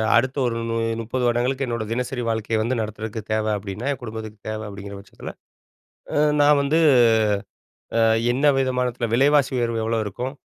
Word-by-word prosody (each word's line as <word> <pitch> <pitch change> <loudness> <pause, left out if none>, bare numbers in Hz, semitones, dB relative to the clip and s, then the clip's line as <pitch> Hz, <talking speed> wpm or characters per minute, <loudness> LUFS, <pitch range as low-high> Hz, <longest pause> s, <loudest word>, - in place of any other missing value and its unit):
அடுத்த 130 +3 +2
ஒரு 115 - -2
மு - - -1 0.3
30 125 +3 -3
வருடங்களுக்கு 125 +3 0
என்னோட 115 -2 -2
தினசரி 125 +1 -2
வாழ்க்கையை 110 0 -1
வந்து 120 +4 0
நடத்துறதுக்கு 110 +1 -5
தேவை 110 0 0
அப்படின்னா, 100 +4 -6
என் 135 - -4
குடும்பத்துக்குத் 110 -2 -8
தேவை. 110 0 -4
அப்படிங்கிற 100 0 -8
பட்சத்துல, 100 - -10 0.8
அ - - 0 0.2
நான் 145 0 +5
வந்து 150 +4 +2 1.2
அ - - +4 0.3
என்ன 135 +4 0
விதமானத்துல 125 -2 -1
விலைவாசி 140 +3 +4
உயர்வு 115 -2 0
எவ்வளவு 115 -1 0
இருக்கும்? 125 +6 -4
115 Hz, 155 wpm, -23 LUFS, 110-130 Hz, 1.2 s, நான்